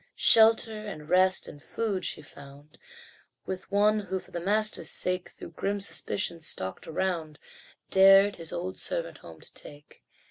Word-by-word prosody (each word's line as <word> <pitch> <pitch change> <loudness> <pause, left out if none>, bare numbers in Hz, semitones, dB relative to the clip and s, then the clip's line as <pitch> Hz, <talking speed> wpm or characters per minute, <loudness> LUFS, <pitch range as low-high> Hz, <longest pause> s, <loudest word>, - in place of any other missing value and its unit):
Shelter, 220 -1 +4
and 155 -7 -8
rest, 185 +1 +3
and 145 - -11
food 200 +2 -3
she 155 - -3
found 140 +1 -13 0.7
With 185 -1 -6
one 210 +2 +3
who, 190 -2 -4
for - - -11
the 175 - -4
master's 210 +4 0
sake, 180 0 -1
Though - - -9
grim 200 +5 -3
suspicion 190 -3 -2
stalked 95 -12 -4
around, 160 -3 -2 0.5
Dared 195 +1 +6
his 165 -1 -6
old 185 +2 -5
servant - - -3
home - - -13
to - - -13
take. 145 0 -10
185 Hz, 150 wpm, -28 LUFS, 160-205 Hz, 0.7 s, Dared